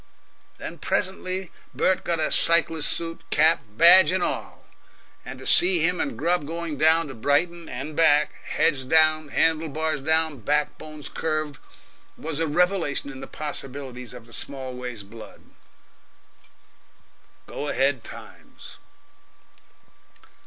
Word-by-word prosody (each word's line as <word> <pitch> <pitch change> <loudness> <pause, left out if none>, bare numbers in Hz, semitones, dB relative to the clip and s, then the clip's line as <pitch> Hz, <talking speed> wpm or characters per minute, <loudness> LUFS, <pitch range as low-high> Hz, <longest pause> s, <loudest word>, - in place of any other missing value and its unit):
Then - - -9
presently 185 -1 -3 0.2
Bert 190 0 0
got 170 -1 -2
a 155 - 0
cyclist's 165 -2 +4
suit, 165 0 -4
cap, 160 +2 +4
badge, 170 - +7
and 185 -1 -1
all; - - -5 0.6
and 130 +1 -9
to 130 - -12
see 175 -3 +6
him 180 +1 0
and 135 -6 -4
Grubb 165 +1 0
going 165 -1 -5
down 160 +2 +2
to 135 - -9
Brighton 160 +8 -1
(and 135 +5 -7
back) 150 -2 +3
heads 140 -5 0
down, 155 +2 +3
handle 160 +2 0
bars 155 0 -2
down, 160 -1 +2
backbones 150 +3 -3
curved 155 -2 -4 0.6
was 160 -1 -5
a 165 - -1
revelation 170 -3 -1
in 135 - -11
the 135 - -9
possibilities 135 -4 -8
of 120 -2 -12
the 115 - -17
Smallways 125 -5 -7
blood. 110 +3 -14 2.0
Go 145 - -7
ahead 135 -3 -1
Times! - - -13
155 Hz, 125 wpm, -23 LUFS, 135-165 Hz, 2.0 s, badge